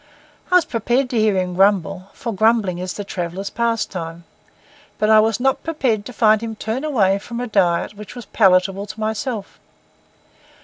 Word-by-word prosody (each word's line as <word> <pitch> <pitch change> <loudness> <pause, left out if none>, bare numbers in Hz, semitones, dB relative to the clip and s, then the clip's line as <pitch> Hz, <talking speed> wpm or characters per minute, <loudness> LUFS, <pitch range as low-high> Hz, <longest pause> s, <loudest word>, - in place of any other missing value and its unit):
I - - +4
was 360 - +5
prepared 245 +3 0
to 235 - +1
hear 215 -3 +2
him 180 -1 -1
grumble, 195 0 +1
for 230 -2 -5
grumbling 215 -3 +2
is 185 0 -4
the 205 - -5
traveller's 190 0 -5
pastime; 185 -8 -2 0.7
but 215 0 +2
I 215 - +8
was 220 0 +2
not 270 +1 +1
prepared 255 -10 -1
to - - -8
find 220 -2 +3
him 225 -1 -5
turn 220 +5 -3
away 200 -10 +2
from 235 +3 -7
a 245 - -2
diet 195 -4 +1
which 210 +1 -11
was 245 - -8
palatable 195 0 +2
to 215 - -9
myself. 220 0 -4
215 Hz, 175 wpm, -20 LUFS, 195-235 Hz, 0.7 s, I